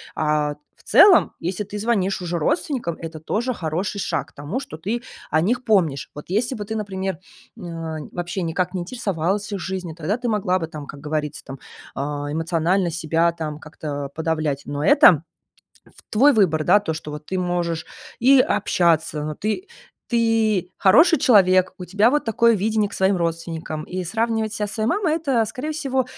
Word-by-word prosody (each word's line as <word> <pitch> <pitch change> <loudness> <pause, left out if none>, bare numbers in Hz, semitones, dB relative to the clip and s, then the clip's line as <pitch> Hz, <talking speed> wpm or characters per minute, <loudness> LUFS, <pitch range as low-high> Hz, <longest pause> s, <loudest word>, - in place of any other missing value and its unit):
А, 150 -1 +1 0.2
в - - -24
целом, 390 -4 +6
если 185 +4 -3
ты 205 +1 -7
звонишь 200 -4 0
уже 175 -1 -2
родственникам, 255 - -1
это 165 -1 -7
тоже 235 +10 -2
хороший 180 +2 -3
шаг 160 -7 -2
к - - -28
тому, 145 - -4
что 155 - -9
ты 220 +9 -3 0.3
о 155 - +3
них 245 +8 0
помнишь. 170 - +1
Вот 150 - -8
если 230 +7 0
бы 210 - -5
ты, 220 +2 -4
например, 190 -4 -3 0.4
н - - -9
а, 165 -2 -5
вообще 175 +1 -3
никак 175 +2 -1
не 185 - -2
интересовалась 200 -1 -2
их 200 - -3
жизнью, 185 -2 -4
тогда 170 +5 -1
ты 245 -1 -3
могла 190 -4 +1
бы, 165 - -3
там, 155 -2 -8
как 140 - -10
говорится, 150 0 -3
там, 135 0 -8 0.4
а, 145 +1 -3
эмоционально 170 +3 0
себя 165 +1 +1
там 155 -2 -5
как-то 145 -3 -6
подавлять. 155 -3 -1
Но 145 +1 -3
это 165 -4 +6 0.6
в - - -21
твой 275 +7 +5
выбор, 170 -8 +3
да. 205 - +6
То, 185 -6 -3
что 155 -1 -7
вот 150 0 -8
ты 185 - -2
можешь 175 -2 -2 0.3
и 270 +2 +6
общаться, 170 -9 +1
но 155 0 -4
ты 215 - -3 0.4
ты 225 -5 +1
хороший 320 - +6
человек, 185 -8 +4
у 180 - -7
тебя 205 +6 +3
вот 295 +2 +1
такое 230 +1 +4
видение 215 0 0
к - - -16
своим 190 +1 +2
родственникам. 165 -2 -3
И 185 +2 -4
сравнивать 220 +3 -1
ся 210 - -2
со 205 - -5
своей 215 -1 -1
мамой- 355 -3 +1
это, 275 -8 +1
скорее 260 +8 -4
всего, 270 -4 -1
185 Hz, 185 wpm, -22 LUFS, 160-220 Hz, 0.6 s, целом